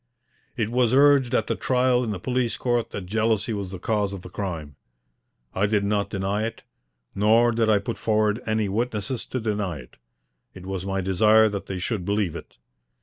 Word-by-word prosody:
It 110 -2 -1
was 125 0 +2
urged 140 -3 +5
at - - +2
the - - -1
trial 125 -1 +2
in 115 - -3
the 105 - -2
police 125 +1 -1
court 120 -2 0
that 100 - -6
jealousy 110 +2 0
was 100 -3 -4
the 95 - -6
cause 100 +1 -1
of 95 -2 -8
the 90 - -10
crime. 80 -8 -5 0.8
I 100 +2 +1
did 105 -1 +1
not 100 0 0
deny 100 +1 -1
it, 115 - -5 0.5
nor 115 +4 +4
did 115 -1 +1
I 105 - +5
put 100 +4 -4
forward 110 +1 +1
any 110 -1 +1
witnesses 115 +3 -2
to 130 - -3
deny 105 -6 -2
it. 65 -3 -14 0.6
It 90 -1 -10
was 95 0 -4
my 95 0 -1
desire 110 +4 +4
that 100 -1 -5
they 95 - -4
should 95 +1 -2
believe 100 -3 -1
it. - - -10
105 Hz, 195 wpm, -24 LUFS, 95-115 Hz, 0.8 s, urged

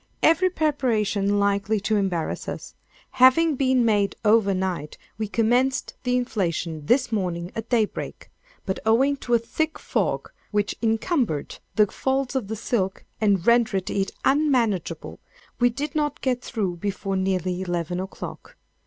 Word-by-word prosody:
—Every 365 +4 +5
preparation 220 - +1
likely 200 +1 +1
to 215 +2 0
embarrass 190 -5 -1
us, - - -7 0.4
having 285 +5 +5
been 260 -2 +2
made 205 -3 +2
over 210 -2 +5
night, 185 -5 -2 0.2
we 215 - -1
commenced 245 +5 +1
the 250 -1 +1
inflation 170 -10 -2
this 255 -1 +3
morning 180 -4 -2
at 225 0 -5
daybreak; 225 -4 -1 0.3
but 190 - -2
owing 260 +6 +3
to 240 -3 0
a - - +6
thick 315 +7 -2
fog, - - -1 0.2
which 205 -1 0
encumbered 225 - 0 0.2
the 210 - +6
folds 265 +5 -1
of 250 -7 -1
the 220 - -3
silk 205 -4 -2 0.2
and 200 -5 +2
rendered 230 -6 +3
it 195 -1 0 0.2
unmanageable, 260 - +1 0.4
we 245 0 +5
did 280 +5 -4
not 295 -2 -1
get 250 -2 0
through 195 -9 -3
before 195 +1 -3
nearly 185 -1 0
eleven 175 -1 -2
o'clock. 190 +1 -7
220 Hz, 145 wpm, -24 LUFS, 190-255 Hz, 0.4 s, a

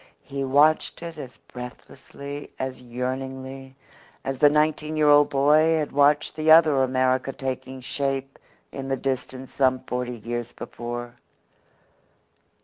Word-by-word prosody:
He 140 0 -4
watched 145 +5 +3
it 165 -2 -7
as 130 -5 -9
breathlessly, 140 +3 -9
as 130 -1 -4
yearningly, 130 +2 -5 0.5
as 135 -1 -4
the 145 - +7
nineteen 155 +1 +1
year 150 -1 +3
old 145 0 +6
boy 150 +4 +4
had 150 -2 -2
watched 145 +1 +3
the 155 0 0
other 155 -4 +7
America 130 0 +1
taking 130 0 -5
shape 135 0 -3 0.3
in 135 -1 -6
the 135 0 -1
distance 130 -1 -4
some 130 -1 +2
forty 125 -1 -3
years 120 +2 -5
before. 120 0 -7
135 Hz, 130 wpm, -24 LUFS, 130-145 Hz, 0.5 s, the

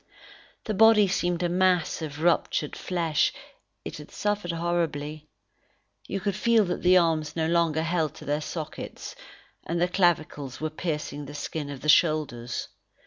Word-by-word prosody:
The 215 - -2
body 215 -1 +6
seemed 180 -2 0
a - - +2
mass 180 -1 +2
of 150 0 -5
ruptured 165 -3 +1
flesh; 165 -4 0 0.5
it - - -6
had 150 - -11
suffered 205 -4 -2
horribly. 160 -3 -2 0.8
You 195 - -2
could 200 0 -2
feel 225 0 +3
that 180 - -3
the 180 +1 +6
arms 160 -3 +1
no 160 -1 0
longer 165 -2 +2
held 160 -3 0
to 155 - -11
their 145 +1 0
sockets; 155 0 -6 0.5
and 170 +1 -2
the 175 - +3
clavicles 155 -7 0
were 155 0 -2
piercing 150 -3 -4
the 145 +1 -9
skin 150 0 -4
of 140 -2 -7
the 150 - -5
shoulders. 145 -8 +2
165 Hz, 155 wpm, -26 LUFS, 150-180 Hz, 0.8 s, body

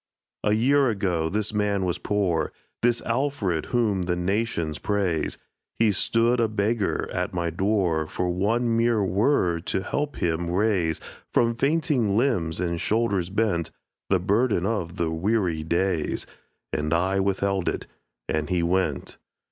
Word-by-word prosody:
A 105 - +3
year 135 +4 +3
ago 90 -7 0
this 105 +2 -1
man 100 -2 +1
was 90 - -1
poor, 100 -5 0 0.3
This 120 0 +2
Alfred 115 - -1
whom 110 -6 +1
the 90 0 0
nations 90 -4 -1
praise; 95 -6 -1 0.4
He 110 -2 +4
stood 115 +4 +2
a 115 - +3
beggar 105 0 0
at 90 +1 -2
my 85 -1 -1
door 90 -3 +1
For 90 - -2
one 115 +6 +1
mere 115 -2 +2
word 95 - +1
to 95 - -1
help 145 +5 -2
him 85 0 -1
raise 90 -4 +1 0.3
From 115 0 +3
fainting 135 - +1
limbs 100 -11 +1
and 85 -2 -1
shoulders 105 -5 +1
bent 95 -5 0 0.4
The 95 - +3
burden 100 0 +1
of 95 -6 -2
the 85 -2 0
weary 90 -1 0
days; 85 +1 0 0.5
And 75 +2 0
I 95 +3 +1
withheld 100 -1 0
it - - -4 0.4
and 80 0 -1
he 90 -2 +1
went. 95 +2 -1
100 Hz, 145 wpm, -25 LUFS, 85-115 Hz, 0.5 s, He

